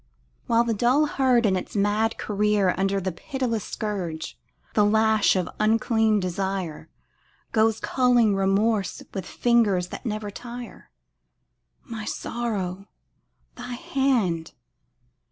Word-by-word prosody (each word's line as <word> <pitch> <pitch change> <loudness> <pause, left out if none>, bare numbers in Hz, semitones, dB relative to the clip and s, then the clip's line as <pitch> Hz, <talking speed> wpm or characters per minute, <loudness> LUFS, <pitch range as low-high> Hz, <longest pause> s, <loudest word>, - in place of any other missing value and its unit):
While 230 0 +4
the 235 -1 0
dull 245 +8 +3
herd 260 -5 +2
in 195 -3 +3
its 185 - -5
mad 210 +2 +1
career 210 -2 +1
Under 195 +1 0
the 190 0 -2
pitiless 230 +3 -3
scourge, 190 -8 -4 0.4
the 210 - +4
lash 220 0 +3
of 185 -2 0
unclean 220 0 +2
desire, 185 -3 -3 0.6
Goes 220 0 +2
culling 245 -5 +3
remorse 195 +2 +1
with 190 -3 -5
fingers 210 -7 +2
that - - -8
never 215 -3 -3
tire: 240 +2 -9 0.9
My 225 -4 -7
sorrow, 200 -6 -3 0.7
thy 245 0 -7
hand! 235 - 0
215 Hz, 115 wpm, -25 LUFS, 195-235 Hz, 0.9 s, While